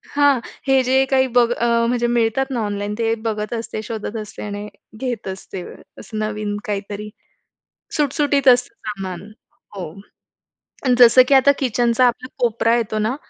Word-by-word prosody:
हां. 285 -2 +4 0.3
हे 270 -1 +4
जे 260 +1 +3
काही 265 -1 +4
बघ 240 -1 +5
म्हणजे 235 +1 +2
मिळतात 235 +2 +1
ना 250 - -1
ऑनलाईन 205 0 -3
ते 225 -1 +1
बघत 215 0 -2
असते, 225 -2 -4
शोधत 220 0 -5
असते 215 0 -9
आणि 205 0 -5 0.3
घेत 245 -5 -4
असते 190 0 -6 0.4
असं 215 - -8
नवीन 215 -1 -3
काहीतरी. 205 0 -4 0.9
सुटसुटीत 285 -1 +1
असतं 245 -2 +4
सामान. 195 -1 -6 0.4
हो. 185 -5 -5 1.0
आणि 250 -1 +4
जसं 245 +1 +8
की 280 - +3
आता 270 +1 +6
किचनचा 245 -1 +2
आपला 245 +1 -2
कोपरा 235 -1 +2
येतो 220 -2 -2
ना 220 +4 0
230 Hz, 150 wpm, -20 LUFS, 210-255 Hz, 1.0 s, जसं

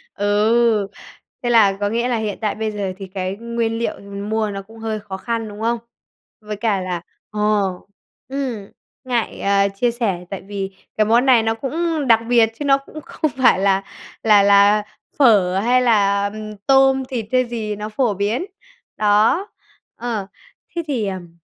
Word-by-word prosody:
Ừ. 205 - -2 1.2
Thế 240 - 0
là 210 -5 +5
có 205 0 0
nghĩa 235 +3 0
là 245 -2 0
hiện 215 -3 -3
tại 215 -2 -1
bây 220 0 -2
giờ 200 -3 -3
thì 195 -1 -8
cái 185 0 -4
nguyên 230 0 -2
liệu 235 - -2
mình 200 +1 -7
mua 220 -1 0
nó 195 -1 -5
cũng 225 +3 -15
hơi 220 -1 -3
khó 200 -2 -7
khăn, 225 +3 -3
đúng 205 +1 -9
không? 235 +1 +1 0.6
Với 210 0 -5
cả 210 -3 0
là, 180 -2 -3 0.3
ờ, 210 - -5 0.9
ừm, 255 -7 -4 0.4
ngại, 240 -3 -1
à, 200 0 +3
chia 215 +5 0
sẻ 205 -7 -2
tại 195 - -5
vì 195 -1 -5 0.2
cái 215 - +4
món 235 +4 +3
này 250 -4 +5
nó 225 0 +1
cũng 310 +4 -2
đặc 230 -2 +6
biệt 235 -2 +5
chứ 295 - -3
nó 275 -1 +5
cũng 290 +3 -11
không 310 0 -3
phải 260 -7 +4
là 195 0 +2 0.4
là 210 -2 +6
là 200 +1 +5 0.4
phở 195 -8 +5
hay 245 +5 +3
là, 200 -4 +3
ừm, 215 -1 -7
tôm, 270 -1 +5
thịt 240 -5 -3
hay 255 0 +3
gì 225 -3 -4
nó 210 +1 -5
phổ 220 0 0
biến. 205 - -1 0.5
Đó, 215 - +3 0.5
ờ, 225 -5 -4 0.5
thế 340 - 0
thì 245 -8 -1
ừm. 175 -3 -7
215 Hz, 180 wpm, -20 LUFS, 200-240 Hz, 1.2 s, đặc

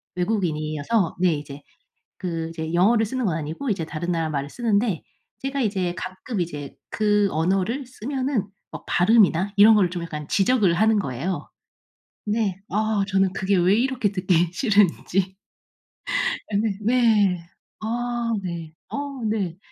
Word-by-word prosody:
외국인이어서 175 -1 0
네 180 -2 +4
이제 145 -1 -8 0.6
그 165 -3 -3
이제 160 -1 -5
영어를 220 +6 +4
쓰는 255 +4 -3
건 175 -6 +1
아니고 160 - -4
이제 185 -6 -1
다른 165 +3 -3
나라 165 -2 0
말을 140 -2 -3
쓰는데 210 -3 0 0.4
제가 275 +1 -2
이제 190 -6 0
가끔 185 +4 -4
이제 145 -5 -5
그 210 -1 +2
언어를 190 - 0
쓰면은 255 -1 -2 0.3
뭐 - - -8
발음이나 195 -1 +4
이런 210 +2 +8
거를 195 -4 +3
좀 175 -1 -4
약간 150 -3 -6
지적을 200 -1 +3
하는 220 +3 +3
거예요. 160 +3 -3 0.8
네. 210 -3 0
아 215 0 +1
저는 195 -1 +2
그게 190 +1 +1
왜 180 +3 +4
이렇게 250 -3 +1
듣기 180 -3 +2
싫은지. 195 -3 +1 1.2
아 - - -1
네 210 -2 0
네. 210 -7 +3 0.3
아 235 +1 -2
네. 170 -3 -5 0.2
어 280 -3 -5
네. 200 -6 -1
195 Hz, 270 characters per minute, -24 LUFS, 170-220 Hz, 1.2 s, 이런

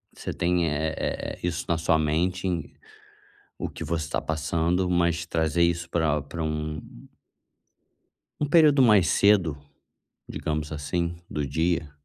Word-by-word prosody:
você - - -5
tem 85 -1 +1
é 80 +2 -1
é - - -3
é - - -20
isso 85 -1 -2
na 85 - +2
sua 80 0 +2
mente, 85 +5 0
em 90 -2 -3 0.9
o - - -3
que 80 - -7
você 80 -1 -2
tá - - 0
passando, 80 +3 0
mas 85 -1 +1
trazer 80 0 +1
isso 85 0 +1
pra 75 -3 +1
pra 80 +3 -6
um 75 -1 -3 1.6
um 150 - 0
período 150 -3 +5
mais 105 -9 +5
cedo, 95 -8 +3 0.7
digamos 75 0 -3
assim, 85 +3 -2
do 75 -2 -2
dia. 80 +1 0
85 Hz, 145 wpm, -26 LUFS, 75-90 Hz, 1.6 s, período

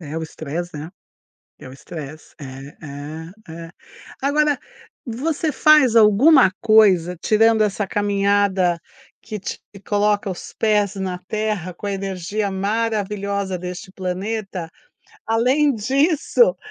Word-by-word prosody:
É 155 -1 -7
o - - -5
stress, 160 +2 -5
né, 150 +3 -7 0.7
é - - -11
o 130 - -11
stress 155 +2 -10
é 135 +1 -10
é 150 +4 -8 0.3
é, 165 - -11 0.5
agora, 295 +1 +2 0.5
você 300 +6 -2
faz 285 -4 +5
alguma 225 +2 +6
coisa, 195 -6 +4
tirando 220 0 +3
essa 205 0 0
caminhada 200 -3 +1 0.4
que 215 - -6
te 195 - -6 0.3
coloca 205 -1 +1
os 180 - -8
pés 210 -2 +1
na 185 -2 -3
terra 210 -5 -2
com 205 - -8
a - - -1
energia 195 +1 -3
maravilhosa 200 -1 -2
deste 180 +1 -7
planeta, 190 -1 -4 0.6
além 255 +6 +2
disso, 295 - +2
200 Hz, 120 wpm, -21 LUFS, 180-225 Hz, 0.7 s, alguma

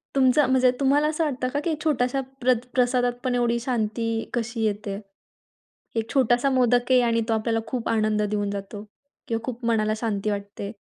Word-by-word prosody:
तुमचं 265 +2 +4
म्हणजे 255 -1 +4
तुम्हाला 285 +2 +3
असं 315 +1 0
वाटतं 255 -4 -1
का 290 - +1
की 325 - +1
छोट्याश्या 270 -3 +1 0.2
प्रत 250 -1 +2
प्रसादातपण 245 0 +1
एवढी 235 -1 +1
शांती 230 -2 -1 0.3
कशी 240 -1 -2
येते? 205 -1 -2 1.0
एक 225 +1 -2
छोटासा 250 0 +3
मोदक 245 -1 +2
आहे 255 -1 +6
आणि 230 -1 +2
तो - - +3
आपल्याला 225 +1 0
खूप 250 -3 -3
आनंद 215 -1 +1
देऊन 205 -1 -1
जातो 200 +1 -6 0.4
किंवा 230 0 -2
खूप 245 -2 -5
मनाला 215 -2 +2
शांती 215 -2 -1
वाटते? 200 0 -5
240 Hz, 165 wpm, -24 LUFS, 215-255 Hz, 1.0 s, आहे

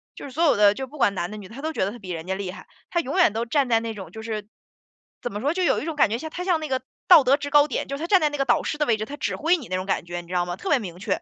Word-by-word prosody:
就 - - -9
是 275 - -8
所 325 +6 0
有 310 - +4
的， 205 -1 +6
就 265 +4 -5
不 300 - -13
管 205 -7 +3
男 175 -2 -3
的 215 - -7
女 200 - -9
的， 225 - -14
他 275 - -8
都 315 - -2
觉 190 - 0
得 200 - -2
他 240 - -10
比 190 - -10
人 165 -2 -4
家 190 - -1
厉 190 -1 -4
害， 195 - -12 0.2
他 345 - 0
永 300 +3 -3
远 350 - +5
都 225 +2 -2
站 265 +2 +1
在 230 -1 +4
那 225 -1 -4
种， 195 -3 -9
就 220 - -8
是 215 -2 -4 0.7
怎 245 - -4
么 205 - -4
说， 285 +7 0
就 370 +1 -1
有 - - +3
一 - - -5
种 325 - -3
感 285 - +4
觉 225 - -1
像 315 +4 -6
他 360 - -5
像 360 -3 +2
那 310 - -4
个 260 -1 -1 0.3
道 335 -6 +9
德 270 +3 +4
制 285 - -5
高 295 0 +6
点， - - -3
就 275 - -3
是 280 - -7
他 - - -2
站 385 0 +5
在 305 - +4
那 290 - -5
个 275 - +3
导 240 - +3
师 - - -3
的 300 - +2
位 225 - +3
置， 215 - -3
他 290 - -7
指 - - -2
挥 335 +4 +2
你 285 -9 -7
那 185 - -2
种 185 - -4
感 195 - -1
觉， 175 0 -5
你 170 - -17
知 180 - -8
道 175 -1 +1
吗？ 175 - -3
特 - - -8
别 290 -4 +4
明 175 -5 -7
确， - - -2
245 Hz, 425 characters per minute, -24 LUFS, 200-300 Hz, 0.7 s, 道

